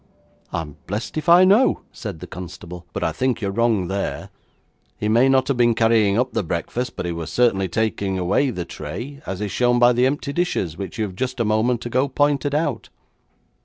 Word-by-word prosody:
'I'm 80 -4 -5
blessed 105 +4 -4
if 155 +1 -2
I 175 +2 +8
know,' 210 +7 +4
said 100 -9 -7
the - - -6
constable, 90 0 -9
'but - - -4
I 80 - +1
think 125 +9 -1
you 100 - -2
are - - -2
wrong 110 -3 +1
there. 100 +2 -3 0.7
He 105 - -2
may 120 +5 +4
not 130 -1 +3
have 140 - 0
been 120 -1 +3
carrying 110 -3 +3
up 125 0 0
the - - +1
breakfast, 110 +8 -3
but - - -4
he 85 - -2 0.2
certainly 100 -6 +2
was - - -17
taking 100 -3 -1
away 95 +10 +1
the 90 -8 -4
tray, 120 - -7
as 95 +1 -4
is 105 -2 -3
shown 120 0 +2
by 120 0 +5
the 125 +2 +3
empty 140 +1 -2
dishes, 140 - -1
which 95 +1 -7
you 110 - 0
have 95 -3 -8
just 130 +4 -3
a 115 - +1
moment 110 +3 +1
ago 130 +3 +1
pointed 145 0 +1
out.' 145 -6 -1
115 Hz, 210 wpm, -22 LUFS, 95-130 Hz, 0.7 s, I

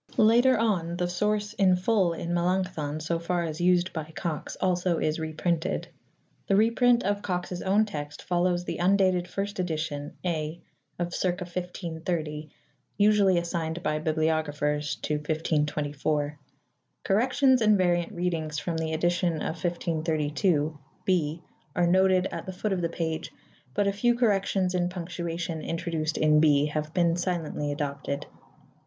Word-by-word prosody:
Later 240 +4 +5
on 180 -7 0
the 180 0 0
source 210 +3 -1
in 195 -4 +4
full 185 -2 +2
in 170 +1 -4
Melanchthon, 175 -4 0
so 165 +2 -1
far 170 +1 -1
as 160 0 -4
used 180 +1 +3
by 160 -2 -3
Cox, 160 -3 -4
also 180 -2 +1
is 155 +1 0
reprinted. 160 +2 -1 0.6
The 195 - +3
reprint 235 +3 +4
of 205 +1 0
Cox's 180 -2 -3
own 205 +3 +3
text 150 -6 -6
follows 175 0 +1
the - - -4
undated 185 -1 +3
first 195 +2 -4
edition 155 -4 -3
(A) 160 -1 -2 0.4
of 175 0 -3
circa 180 0 -1
1530, 170 -3 -4 0.5
usually 205 -3 +4
assigned 170 -1 -2
by 155 0 0
bibliographers 155 -2 0
to 150 - 0
1524. 150 -1 -1 0.6
Corrections 255 +5 +3
and 215 -1 +5
variant 175 -1 +1
readings 170 -5 -2
from 165 +2 -2
the 160 0 -2
edition 175 +2 +1
of 155 +1 -4
1532 160 -2 0 0.3
(B) 165 -3 0 0.3
are 175 - +3
noted 185 +1 +4
at 170 +1 -6
the 185 - -4
foot 205 +2 -1
of 185 - -1
the 170 - 0
page; 160 -1 -3 0.4
but 205 - +2
a 200 - +1
few 240 +4 +2
corrections 195 -5 +1
in 175 -1 +1
punctuation 170 -2 -4
introduced 165 -2 -2
in 150 0 +4
B 145 -2 +4
have 150 0 -3
been 170 -1 +2
silently 170 -5 -2
adopted. 140 0 -3
175 Hz, 145 wpm, -27 LUFS, 155-185 Hz, 0.6 s, Later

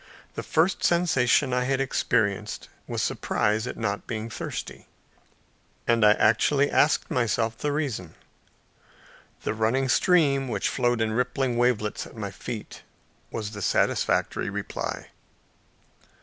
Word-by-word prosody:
The - - -4
first 170 +4 +1
sensation 140 -6 +3
I 125 0 +1
experienced 115 -6 0 0.2
was - - -2
surprise 110 +3 0
at - - -5
not 105 -3 -3
being 115 -1 -4
thirsty, - - -6 1.0
and 115 -1 +3
I 105 0 +8
actually 135 +7 +3
asked 145 - +2
myself 115 -1 0
the 145 +6 -2
reason. 135 - -3 1.3
The - - -1
running 115 +5 +1
stream, 140 -7 +3
which 105 -5 -1
flowed 120 -2 +1
in 110 -1 0
rippling 125 +1 0
wavelets 120 -3 0
at - - -15
my 100 -2 -4
feet, 110 +3 -7 0.5
was 105 -2 -4
the 105 -2 -7
satisfactory - - +1
reply. - - -5
120 Hz, 120 wpm, -26 LUFS, 110-135 Hz, 1.3 s, I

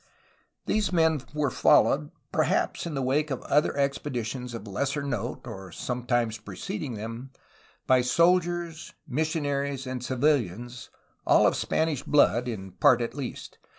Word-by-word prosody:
These 210 -2 +1
men 160 -4 +3
were 150 -2 0
followed, 75 -9 +4 0.2
perhaps - - 0
in 160 - -4
the 135 - -1
wake 145 +4 +1
of 135 - -4
other 150 0 +2
expeditions 125 -3 -2
of 115 - -7
lesser 140 +8 -2
note 120 -7 -3
(or 95 -1 -8
sometimes 120 +1 -1
preceding 105 +5 -5
them), 115 +5 -6 0.6
by 130 -1 +4
soldiers, 170 +3 +1
missionaries, 140 -2 -1
and 130 -1 -4
civilians, 120 - -1 0.4
all - - +6
of - - +3
Spanish 160 -4 0
blood, 125 -4 +3
in 95 -5 -5
part 130 - +4
at 120 - -3
least. 135 -2 -7
130 Hz, 135 wpm, -27 LUFS, 120-150 Hz, 0.6 s, all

